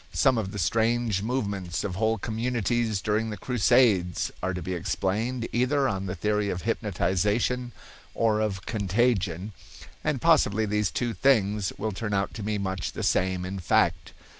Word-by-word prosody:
Some 130 -4 +3
of 95 -3 -3
the 100 - -6
strange 115 +2 +1
movements 100 -8 -2
of 100 - -3
whole 110 +4 +1
communities 115 -1 -1
during 110 +1 0
the 105 - -5
Crusades 110 -6 +2
are 95 - -1
to 90 0 -4
be 95 - -3
explained 110 +7 -1
either 135 +3 +2
on 95 -1 -2
the 90 - -3
theory 105 +2 0
of 90 -2 -3
hypnotization 105 +3 0 0.4
or 110 -2 +2
of 100 -3 -2
contagion, 100 -3 0 0.5
and 150 -3 0
possibly 110 -1 +3
these 105 -1 0
two 115 +9 -2
things 105 -7 +2
will 110 +2 -2
turn 105 +1 -3
out 100 0 -1
to 110 - -6
be 105 +1 -1
much 95 -2 -3
the - - -5
same 95 0 +1
in 95 +1 -5
fact. 85 - +1
105 Hz, 165 wpm, -27 LUFS, 95-115 Hz, 0.5 s, Some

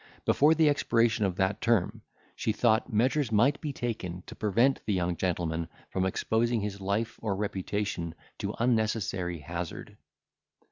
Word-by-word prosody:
Before 150 +3 +5
the 160 -1 +4
expiration 115 -6 +2
of 95 -2 -1
that 95 +2 0
term, 115 -6 +1 0.3
she 110 - -1
thought 110 +2 +2
measures 125 +4 +2
might 125 +7 +3
be 150 - -2
taken 95 -9 -4
to - - -9
prevent 115 +6 +2
the 105 - +2
young 90 -1 0
gentleman 85 -2 -1 0.2
from 95 0 +1
exposing 115 +4 0
his 100 -1 -4
life 105 +4 -1
or 105 -4 -1
reputation 95 -4 -3 0.2
to - - -3
unnecessary 110 -6 0
hazard. 85 +3 -6
105 Hz, 145 wpm, -29 LUFS, 95-120 Hz, 0.3 s, Before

